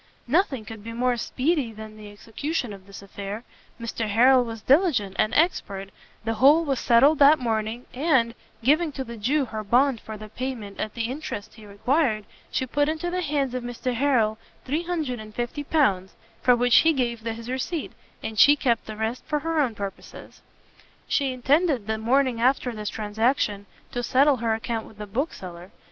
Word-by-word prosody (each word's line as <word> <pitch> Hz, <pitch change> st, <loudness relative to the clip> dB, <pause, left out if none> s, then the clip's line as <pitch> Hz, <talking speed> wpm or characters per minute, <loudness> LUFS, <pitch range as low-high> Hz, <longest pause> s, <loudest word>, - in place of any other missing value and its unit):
Nothing 270 Hz, -, +1 dB
could 220 Hz, -2 st, -9 dB
be 230 Hz, +1 st, -7 dB
more 245 Hz, +1 st, +1 dB
speedy 260 Hz, +2 st, -1 dB
than 215 Hz, 0 st, -10 dB
the 210 Hz, -1 st, -11 dB
execution 235 Hz, +4 st, -4 dB
of 195 Hz, -1 st, -13 dB
this 200 Hz, 0 st, -11 dB
affair, 200 Hz, +3 st, -6 dB, 0.4 s
Mr 230 Hz, -1 st, -3 dB
Harrel 250 Hz, +4 st, +5 dB
was 225 Hz, -2 st, -7 dB
diligent 265 Hz, -, +3 dB
and 215 Hz, -, +3 dB
expert, 200 Hz, -, 0 dB, 0.4 s
the 225 Hz, -, 0 dB
whole 285 Hz, +8 st, +5 dB
was 275 Hz, -4 st, 0 dB
settled 270 Hz, +6 st, +5 dB
that 290 Hz, +2 st, +7 dB
morning, 225 Hz, -1 st, -2 dB
and, 260 Hz, -5 st, +2 dB, 0.3 s
giving 305 Hz, +5 st, +3 dB
to 265 Hz, -, -4 dB
the 235 Hz, -2 st, -8 dB
Jew 265 Hz, +7 st, +1 dB
her 220 Hz, -2 st, -5 dB
bond 245 Hz, +3 st, +2 dB
for 220 Hz, -1 st, -8 dB
the 215 Hz, 0 st, -9 dB
payment 230 Hz, -4 st, -5 dB
at 215 Hz, -, -3 dB
the 230 Hz, -, -2 dB
interest 230 Hz, -4 st, -5 dB
he 215 Hz, -2 st, -14 dB
required, 215 Hz, +1 st, 0 dB, 0.2 s
she 260 Hz, -, -1 dB
put 290 Hz, +3 st, +1 dB
into 320 Hz, +3 st, -2 dB
the 365 Hz, 0 st, -1 dB
hands 285 Hz, -5 st, -1 dB
of 255 Hz, -, -2 dB
Mr 245 Hz, +1 st, -3 dB
Harrel 230 Hz, -4 st, +2 dB, 0.3 s
L350, 255 Hz, -, -1 dB, 0.3 s
for 250 Hz, -, +5 dB
which 245 Hz, 0 st, +4 dB
he 325 Hz, 0 st, +5 dB
gave 240 Hz, -4 st, -1 dB
his 230 Hz, +1 st, -6 dB
receipt, 265 Hz, +6 st, -3 dB, 0.3 s
and 220 Hz, -1 st, -4 dB
she 290 Hz, +1 st, +8 dB
kept 240 Hz, -5 st, 0 dB
the 215 Hz, -1 st, -7 dB
rest 220 Hz, +3 st, -2 dB
for 305 Hz, -1 st, 0 dB
her 325 Hz, 0 st, -1 dB
own 245 Hz, -6 st, 0 dB
purposes. 200 Hz, -1 st, -8 dB, 0.7 s
She 275 Hz, -2 st, +1 dB
intended 270 Hz, -, +2 dB
the 220 Hz, 0 st, -2 dB
morning 250 Hz, +1 st, +2 dB
after 255 Hz, 0 st, +2 dB
this 210 Hz, -1 st, -4 dB
transaction 210 Hz, -1 st, -1 dB, 0.2 s
to 245 Hz, -, -2 dB
settle 270 Hz, +3 st, +3 dB
her 225 Hz, -1 st, 0 dB
account 225 Hz, 0 st, -4 dB
with 220 Hz, -, -16 dB
the 210 Hz, -, -6 dB
bookseller. 190 Hz, -, -5 dB
240 Hz, 175 wpm, -25 LUFS, 220-280 Hz, 0.7 s, she